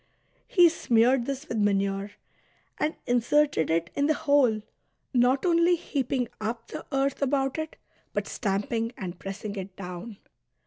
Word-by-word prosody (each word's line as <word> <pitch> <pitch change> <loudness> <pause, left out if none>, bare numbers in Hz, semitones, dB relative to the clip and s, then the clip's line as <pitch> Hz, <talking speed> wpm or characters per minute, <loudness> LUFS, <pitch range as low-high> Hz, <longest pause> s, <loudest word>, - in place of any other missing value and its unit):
He 355 -2 +6
smeared 245 -5 +3
this 275 +2 -4
with 225 - -2
manure, 200 0 0 0.7
and 310 - 0
inserted 245 - +2
it 165 +1 0
in 285 0 +1
the 310 - +3
hole, 275 -9 +3 0.5
not 255 +3 +3
only 340 0 +4
heaping 265 -6 -1
up 230 +2 -4
the - - -7
earth 275 +1 0
about 270 +1 +1
it, 315 0 -4 0.4
but - - -2
stamping 225 +3 -2
and 180 -2 -6
pressing 200 +1 -6
it 190 0 -6
down. 185 +3 -7
240 Hz, 140 wpm, -27 LUFS, 200-280 Hz, 0.7 s, He